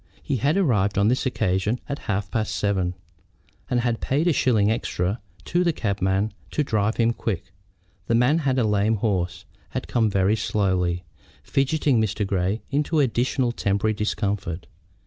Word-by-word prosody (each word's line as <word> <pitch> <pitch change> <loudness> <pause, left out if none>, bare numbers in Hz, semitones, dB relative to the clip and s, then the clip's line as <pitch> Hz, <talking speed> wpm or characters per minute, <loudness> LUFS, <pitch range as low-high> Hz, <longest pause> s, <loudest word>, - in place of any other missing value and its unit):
He 140 - -1
had 145 - +1
arrived 105 - +2
on 100 +2 +4
this 130 +2 +1
occasion 100 0 0
at 140 0 -4
half 100 -1 -1
past 110 -2 -1
seven, 95 -3 0 0.7
and 125 -2 +2
had 120 -1 -1
paid 145 +5 +1
a 175 - +4
shilling 110 -7 +3
extra 105 -2 -1 0.2
to 175 +1 +1
the 170 - +3
cabman 100 - 0 0.2
to 150 - 0
drive 110 -4 0
him 115 0 +3
quick. 95 -5 -4 0.6
The 115 - +2
man, 125 +7 +4
having 130 -5 +1
a - - +1
lame 105 +1 +2
horse, 95 -4 -1 0.2
had - - -4
come 115 -3 +2
very 100 +1 +2
slowly, 95 -5 0 0.4
fidgeting 135 - +2
Mr. 105 -1 -1
Grey 95 +2 -1
into 150 +3 +1
additional 125 -1 +1
temporary 100 -1 0
discomfort. 100 -5 -2
110 Hz, 160 wpm, -24 LUFS, 100-125 Hz, 0.7 s, on